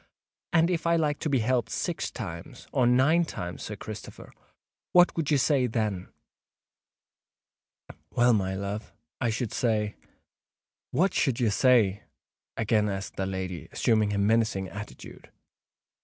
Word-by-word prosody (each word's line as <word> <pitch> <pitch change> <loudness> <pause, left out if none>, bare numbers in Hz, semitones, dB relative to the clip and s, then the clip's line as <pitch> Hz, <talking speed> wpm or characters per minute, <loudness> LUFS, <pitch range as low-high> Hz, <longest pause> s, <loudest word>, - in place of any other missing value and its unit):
"And 170 0 +3
if 170 -1 -1
I 170 - +4
like 150 -3 0
to 155 - -2
be 140 - +2
helped 120 -2 +1
six 175 -3 -2
times—or 100 +5 -3
nine 135 +8 +4
times, 90 - -6
Sir 105 - -5
Christopher—what 110 - -2
should 160 -3 -1
you 150 - +4
say 135 -1 +2
then?" 110 -5 -2 2.0
"Well, 120 0 +3
my 95 -3 0
love—I 110 +4 -5
should 110 0 -2
say——" 105 -3 0 1.0
"What 190 +4 +1
should 135 -6 +1
you 115 -4 +2
say?" 105 -4 +3 0.6
again 110 -1 +2
asked 95 0 -5
the 95 - -2
lady, 95 -2 -5
assuming 110 -2 +2
a 100 - -1
menacing 105 -2 +1
attitude. 100 +1 -10
110 Hz, 125 wpm, -27 LUFS, 100-135 Hz, 2.0 s, I